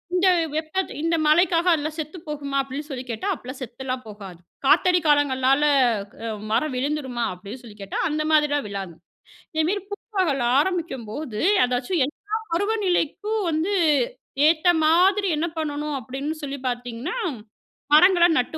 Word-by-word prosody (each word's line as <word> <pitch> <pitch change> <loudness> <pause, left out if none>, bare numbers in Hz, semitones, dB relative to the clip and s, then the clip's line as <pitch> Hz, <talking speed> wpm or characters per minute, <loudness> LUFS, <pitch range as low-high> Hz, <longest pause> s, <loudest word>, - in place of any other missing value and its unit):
இந்த 370 +1 +3 0.3
வெப்பத் 320 +5 -2
இந்த 330 +1 +1
மழைக்காக 335 +3 +3
அதெல்லாம் 310 -1 0
செத்துப் 315 +2 -6
போகுமா? 280 -2 -3
அப்படின்னு 275 +3 -6
சொல்லி 260 -2 -5
கேட்டா, 220 -1 -4
அப்படிலாம் 255 +2 -8
செத்தலாம் 255 +1 -5
போகாது. 195 -5 -10 0.3
காத்தடி 360 +5 +5
காலங்கள்னால 275 -2 +3 0.6
அ 230 - -2 0.2
மரம் 285 +4 +1
விழுந்துருமா? 260 -3 -2
அப்படின்னு 200 +7 -10
சொல்லி 215 -3 -12
கேட்டா, 195 - -5
அந்த 305 0 -1
மாதிரிலாம் 295 -3 +2
விழாது. 195 -4 -5 0.6
இதேமேரி 340 +6 0
பூப்பகல் 375 - -1
ஆரம்பிக்கும்போது, 285 - -2 0.2
அதாச்சும் 250 +6 -1
எல்லா 410 +8 -6 0.2
பருவநிலைக்கும் 410 +1 0
வந்து 330 +6 0 0.7
ஏத்த 320 +2 +2 0.2
மாதிரி 375 +5 +4
என்ன 330 - 0
பண்ணணும் 295 -1 -3
அப்படின்னு 275 +6 -4
சொல்லி 280 -1 -4
பார்த்தீங்கன்னா, 245 - -4 0.8
மரங்கள 350 +1 +6
நட்டு 250 +6 -2
300 Hz, 130 wpm, -23 LUFS, 255-340 Hz, 0.8 s, மரங்கள